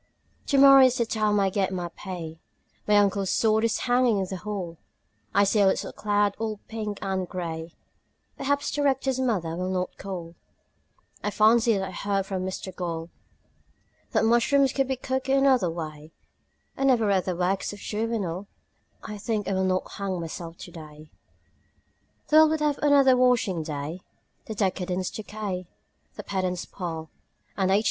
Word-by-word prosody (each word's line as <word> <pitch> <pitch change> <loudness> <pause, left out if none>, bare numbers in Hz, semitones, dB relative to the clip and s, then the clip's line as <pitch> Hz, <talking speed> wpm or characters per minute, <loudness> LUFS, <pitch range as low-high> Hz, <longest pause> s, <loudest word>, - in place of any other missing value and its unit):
Tomorrow 275 -1 +8
is 255 0 +2
the 235 - +1
time 215 -2 +1
I 195 -1 +2
get 195 0 0
my 180 -2 -3
pay 170 -3 -7 0.5
My 210 - +4
uncle's 200 -1 +2
sword 220 0 +2
is 230 - +1
hanging 245 -3 +3
in 190 - 0
the 190 0 -5
hall 180 -4 -5 0.5
I 200 - +4
see 205 +2 +2
a 200 - +5
little 190 - 0
cloud 205 -1 +1
all 220 -2 -3
pink 215 -2 -4
and 190 -2 -2
grey 165 -2 -5 0.6
Perhaps 285 +1 -1
the 290 - -1
Rector's 265 -2 +1
mother 190 -11 0
will 180 +1 -2
not 185 -1 -2
call 175 -4 -6 0.9
I - - 0
fancy 225 +1 +4
that 190 0 -2
I - - -7
heard 195 +1 -1
from 190 -2 -3
Mr 185 0 -5
Gall 165 -2 -4 1.0
That - - +2
mushrooms 260 +4 +3
could 270 -1 +1
be 265 - 0
cooked 260 +1 -3
another 265 -8 +4
way 155 -2 -7 0.6
I - - -3
never 250 -5 +4
read 195 -3 +2
the 185 - -1
works 185 +2 0
of 205 - -9
Juvenal 205 -4 -3 0.6
I 210 -1 -7
think 210 -2 -2
I 195 - 0
will 190 0 +1
not 185 0 0
hang 190 -2 -2
myself 165 0 -6
today. 155 -3 -11 1.2
The 305 - +5
world 315 0 +8
will 300 - +2
have 290 - -1
another 280 -3 +5
washing 245 -8 +2
day; 155 +3 -5 0.5
The 220 - -5
decadents 185 -2 -1
decay; 205 -4 -5 0.5
the - - -7
pedants 185 -2 -2
pall; 160 -3 -6 0.4
And 190 -2 +1
H. 195 +2 +4
200 Hz, 165 wpm, -26 LUFS, 180-230 Hz, 1.2 s, Tomorrow